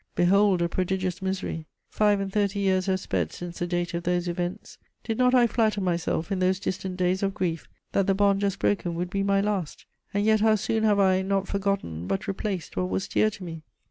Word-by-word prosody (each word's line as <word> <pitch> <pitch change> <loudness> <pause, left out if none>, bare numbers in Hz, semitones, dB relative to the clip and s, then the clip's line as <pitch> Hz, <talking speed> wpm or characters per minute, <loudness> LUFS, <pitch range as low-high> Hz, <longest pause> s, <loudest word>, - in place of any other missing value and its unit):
Behold 190 0 +4
a - - +2
prodigious 185 0 -2
misery: 190 -4 -3 0.2
five 210 -1 +3
and 195 -1 -4
thirty 205 -1 +1
years 190 -1 +1
have 190 -1 +1
sped 90 - -2
since 175 -1 -7
the 175 - -1
date 175 0 -2
of 170 - -2
those 175 0 0
events. 175 +1 -4 0.2
Did 225 0 -3
not 250 0 +4
I 245 -1 +6
flatter 220 -2 +1
myself, 175 -1 -1
in 195 - 0
those 185 0 +2
distant 190 -1 -4
days 185 +1 +1
of 195 -1 -1
grief, 165 -3 -2 0.2
that 195 - +1
the 195 - +3
bond 200 0 +3
just 200 -1 0
broken 175 -4 0
would 175 +1 -3
be 195 - 0
my 195 0 +2
last? 200 -6 -2 0.3
And 205 +1 0
yet 220 0 +4
how 220 0 +5
soon 220 +1 -1
have 210 -2 +4
I, 190 -1 +4
not 195 0 0
forgotten, 195 - -2
but 195 - -2
replaced 195 -3 -3
what 90 0 -1
was 95 +1 -2
dear 215 - +2
to 200 -2 -10
me! 165 -2 -7
190 Hz, 220 wpm, -26 LUFS, 175-200 Hz, 0.3 s, I